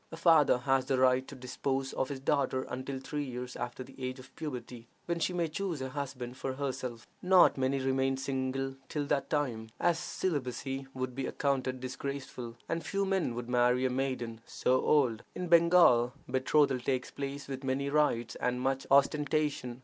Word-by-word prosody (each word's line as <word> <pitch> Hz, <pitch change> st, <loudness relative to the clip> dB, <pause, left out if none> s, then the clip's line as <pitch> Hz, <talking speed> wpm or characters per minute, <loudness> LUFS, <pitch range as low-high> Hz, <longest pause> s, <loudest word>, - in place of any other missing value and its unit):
A 165 Hz, -, -7 dB
father 165 Hz, -6 st, +5 dB
has 135 Hz, +1 st, +1 dB
the 135 Hz, -, +2 dB
right 130 Hz, 0 st, +3 dB
to 140 Hz, -, -9 dB
dispose 135 Hz, +1 st, -2 dB
of 130 Hz, -, -1 dB
his 140 Hz, -2 st, -4 dB
daughter 135 Hz, -1 st, +1 dB
until 130 Hz, +1 st, -5 dB
three 145 Hz, +2 st, -3 dB
years 125 Hz, -1 st, -6 dB
after 120 Hz, +1 st, -5 dB
the 135 Hz, -, -14 dB
age 130 Hz, +1 st, -3 dB
of 130 Hz, 0 st, -14 dB
puberty, 125 Hz, -5 st, -6 dB, 0.2 s
when 170 Hz, -1 st, -1 dB
she 175 Hz, -, +1 dB
may 175 Hz, -2 st, 0 dB
choose 170 Hz, 0 st, -3 dB
a 130 Hz, 0 st, -3 dB
husband 130 Hz, -3 st, -5 dB
for 130 Hz, 0 st, -3 dB
herself: 130 Hz, -4 st, -4 dB, 0.2 s
not 185 Hz, 0 st, +6 dB
many 130 Hz, +1 st, +1 dB
remain 135 Hz, 0 st, +1 dB
single 135 Hz, 0 st, -2 dB, 0.2 s
till 150 Hz, -2 st, -2 dB
that 140 Hz, -1 st, 0 dB
time, 120 Hz, -7 st, -1 dB
as 170 Hz, -1 st, +2 dB
celibacy 135 Hz, -4 st, -3 dB
would 130 Hz, -1 st, -3 dB
be 130 Hz, 0 st, -3 dB
accounted 130 Hz, -2 st, -1 dB
disgraceful, 130 Hz, -2 st, -5 dB
and 165 Hz, 0 st, -2 dB
few 195 Hz, +5 st, -1 dB
men 190 Hz, -11 st, 0 dB
would 120 Hz, 0 st, -5 dB
marry 125 Hz, +1 st, +3 dB
a 130 Hz, -, +1 dB
maiden 125 Hz, -3 st, -2 dB
so 130 Hz, +1 st, +1 dB
old. 125 Hz, -7 st, +3 dB
In 180 Hz, -, -3 dB
Bengal, 170 Hz, -8 st, +6 dB
betrothal 130 Hz, +1 st, +2 dB
takes 125 Hz, 0 st, -2 dB
place 140 Hz, 0 st, -5 dB
with 135 Hz, 0 st, -5 dB
many 135 Hz, +1 st, -1 dB
rites 140 Hz, -6 st, +2 dB
and 125 Hz, 0 st, -1 dB
much 135 Hz, +1 st, -1 dB
ostentation. 140 Hz, -2 st, +2 dB
135 Hz, 180 wpm, -31 LUFS, 125-145 Hz, 0.2 s, not